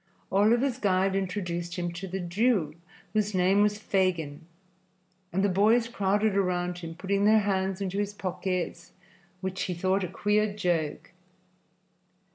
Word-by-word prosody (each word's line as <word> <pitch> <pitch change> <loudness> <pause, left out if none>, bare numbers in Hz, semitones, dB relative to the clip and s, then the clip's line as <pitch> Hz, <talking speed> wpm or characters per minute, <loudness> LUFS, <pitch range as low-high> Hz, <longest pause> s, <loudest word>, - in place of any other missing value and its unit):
Oliver's 235 +6 +3
guide 190 -2 +2
introduced 180 -3 -3
him 175 -2 -2
to 180 +3 -6
the 190 +1 -4
Jew, 180 -2 +1 0.4
whose 210 -2 0
name 185 +2 +4
was 210 0 +2
Fagin, 170 -7 -1 0.8
and 195 +3 0
the - - +4
boys 215 +5 +3
crowded 205 -2 +1
around 180 -2 0
him, 165 -1 -7
putting 200 +2 0
their 215 +1 +6
hands 195 -1 -1
into 195 0 -2
his 205 0 -1
pockets, 185 -1 -3 0.5
which 190 0 -3
he 180 - -3
thought 185 +3 +1
a - - -1
queer 210 +4 +1
joke. 170 -7 -1
190 Hz, 140 wpm, -28 LUFS, 180-205 Hz, 0.8 s, their